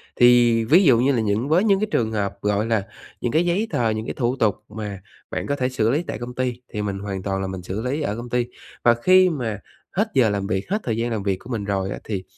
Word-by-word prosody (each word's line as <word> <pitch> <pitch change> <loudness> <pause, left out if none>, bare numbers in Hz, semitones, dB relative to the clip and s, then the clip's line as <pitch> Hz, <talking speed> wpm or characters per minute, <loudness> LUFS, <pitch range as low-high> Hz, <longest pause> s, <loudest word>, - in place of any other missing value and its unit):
Thì 120 -2 +5
ví 170 - +6
dụ 130 -8 +5
như 135 +3 +3
là 120 -4 +1
những 110 +6 0
với 175 +5 +4
những 200 -3 +3
cái 215 - 0
trường 110 - +1
hợp, 100 -2 -2
gọi 105 +1 +1
là, 110 -3 0 0.4
những 120 - -1
cái 165 +6 +2
giấy 185 +6 +1
tờ, 115 -2 +1
những 110 0 -2
cái - - -4
thủ 120 0 0
tục 110 -6 +2
mà 105 -3 -6 0.3
bạn - - -3
có 140 - 0
thể 130 -2 0
xử 115 -4 +1
lý 150 +6 +1
tại - - -5
công 120 +1 -7
ty, 125 -1 -2
thì 105 - -2
mình 100 -2 -3
hoàn 100 -2 -5
toàn 95 -1 -2
là 95 - -2
mình 95 -1 -5
xử 95 +4 -4
lý 130 +6 -2
ở 105 -8 -1
công 120 +1 -7
ty. 125 0 +1 0.4
Và 120 - +6
khi 185 0 +6
mà 120 - -3 0.3
hết 210 +4 +1
giờ 125 -5 +4
làm 100 -1 -2
việc, 95 +3 -2
hết 205 +3 +1
thời 115 -2 -1
gian 120 +1 -1
làm 110 -3 -2
việc 95 -2 0
của 115 - -13
mình 115 -4 -2
rồi 95 -1 -1
á, - - -5
thì 100 -4 -4
115 Hz, 280 wpm, -23 LUFS, 105-130 Hz, 0.4 s, ví